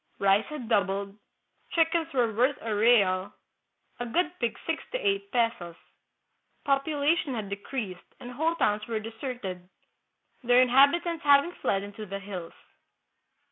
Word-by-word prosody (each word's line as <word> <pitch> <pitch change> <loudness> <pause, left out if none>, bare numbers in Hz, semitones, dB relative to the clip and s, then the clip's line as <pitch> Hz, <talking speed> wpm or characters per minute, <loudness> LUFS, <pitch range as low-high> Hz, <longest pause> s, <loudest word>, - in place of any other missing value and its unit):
Rice 200 +2 +3
had 300 -6 -7
doubled, 200 -2 0 0.6
chickens 330 0 +1
were 240 -4 +1
worth 250 +5 +2
a 225 -1 -3
real, 205 -4 +3 0.6
a 245 - -3
good 340 +7 0
pig 235 -2 -1
six 325 -1 -2
to - - +1
eight 400 -4 -1
pesos. 230 -8 -1 0.9
Population 285 +1 +1
had 210 -3 -4
decreased, 200 -2 -6
and 245 - -9
whole 320 +6 0
towns 210 -9 0
were 225 -2 -2
deserted, 220 -5 -6 0.7
their 245 +1 +5
in 255 0 +5
habitants 315 +6 +3
having 285 +3 +5
fled 195 - -1
into 205 +1 -8
the 195 +1 -4
hills. 195 -4 -7
235 Hz, 140 wpm, -27 LUFS, 200-285 Hz, 0.9 s, their